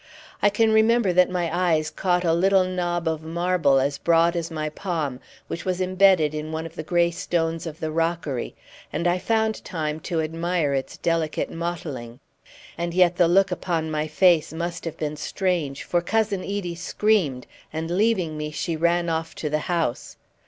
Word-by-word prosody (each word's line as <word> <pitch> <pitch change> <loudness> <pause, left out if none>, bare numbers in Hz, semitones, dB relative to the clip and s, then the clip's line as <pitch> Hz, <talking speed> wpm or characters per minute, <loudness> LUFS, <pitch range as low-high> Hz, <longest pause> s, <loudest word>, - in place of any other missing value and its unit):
I 205 - +5
can 220 +2 +2
remember 220 -2 +4
that 180 0 +5
my 175 -2 -1
eyes 160 -4 +1
caught 180 -1 0
a 165 - +3
little 190 +2 +4
knob 175 -2 -2
of 160 -1 -1
marble 165 -3 +2
as 140 +1 -1
broad 170 +1 +3
as 170 -1 -2
my 155 -2 -3
palm, 155 -6 -3 0.3
which 170 - -5
was 185 -1 -1
imbedded 185 -4 +4
in 155 +1 -4
one 160 +1 -3
of 165 - -8
the 165 - -5
grey 170 +2 +2
stones 165 -1 -2
of 160 0 -8
the 160 -3 -3
rockery, 165 -5 -2 0.4
and 170 +3 -1
I 175 +1 +2
found 220 +3 0
time 155 -2 -3
to 165 +1 -2
admire 165 -1 -1
its 135 -1 -3
delicate 165 -2 -1
mottling. 150 -8 -5 0.6
And 170 0 -2
yet 180 -1 +4
the 175 - +5
look 190 +2 +4
upon 165 -3 -2
my 155 0 -1
face 165 +1 +3
must 170 +1 -4
have 165 - -5
been 150 -1 -3
strange, 165 -5 -2
for 175 - 0
Cousin 210 +1 0
Edie 195 -3 -3
screamed, 180 -6 0 0.3
and 160 +1 -4
leaving 185 -5 +1
me 150 0 -3
she 165 +2 -3
ran 170 +2 +1
off 165 0 -2
to 150 - -4
the 155 - +1
house. 165 -8 -1
170 Hz, 180 wpm, -24 LUFS, 155-180 Hz, 0.6 s, I